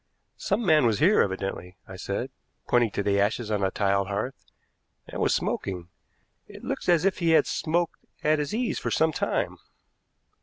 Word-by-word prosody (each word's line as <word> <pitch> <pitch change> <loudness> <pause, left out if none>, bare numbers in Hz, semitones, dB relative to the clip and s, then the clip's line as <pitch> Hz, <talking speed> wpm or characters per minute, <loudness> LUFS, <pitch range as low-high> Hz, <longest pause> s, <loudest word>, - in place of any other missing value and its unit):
"Some 210 +4 -1
man 155 -7 +5
was 110 -3 +1
here, 185 +7 +4
evidently," 95 -2 -3
I 95 - -9
said, 100 +7 -4 0.4
pointing 120 -2 +3
to 100 - -3
the 100 0 +2
ashes 110 +2 0
on 105 -2 0
the 95 - +2
tiled 100 0 0
hearth, 105 +7 -4 0.6
"and - - -5
was - - +2
smoking. 90 -2 -3 0.6
It - - -12
looks - - -3
as 175 0 +4
if 195 - +1
he 170 -2 +1
had - - +3
smoked 170 +1 -1 0.2
at 155 0 +3
his 150 0 -2
ease 235 +2 -1
for - - -3
some 160 0 +2
time." - - -2
120 Hz, 180 wpm, -26 LUFS, 100-160 Hz, 0.6 s, man